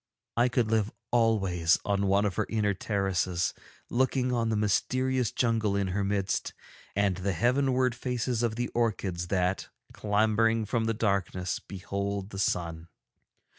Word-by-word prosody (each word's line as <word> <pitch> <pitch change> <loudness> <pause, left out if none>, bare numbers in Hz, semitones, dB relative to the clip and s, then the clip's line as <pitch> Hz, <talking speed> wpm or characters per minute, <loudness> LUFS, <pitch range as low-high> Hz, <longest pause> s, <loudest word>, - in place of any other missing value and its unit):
I 120 +2 +3
could 120 -3 +1
live 110 -1 +2 0.2
always 95 -8 +3
on 100 -1 +1
one 100 +2 +3
of 100 - 0
her - - 0
inner 105 -2 +1
terraces 95 -3 0 0.3
looking 130 0 +1
on 115 -2 +1
the 110 - +1
mysterious 130 +4 +1
jungle 115 -4 +1
in 100 -1 0
her 100 +2 -1
midst 100 -1 -1 0.4
and 100 -2 +2
the 95 +1 -1
heavenward 125 - +2
faces 125 -1 -2
of 115 -2 0
the 120 +1 -2
orchids 100 -7 -1
that, 90 0 0 0.2
clambering 110 +2 +2
from 115 +1 0
the 115 0 0
darkness, 100 -4 -1
behold 100 +1 -4
the 95 - -6
sun. 85 -4 -1
105 Hz, 145 wpm, -29 LUFS, 95-115 Hz, 0.4 s, I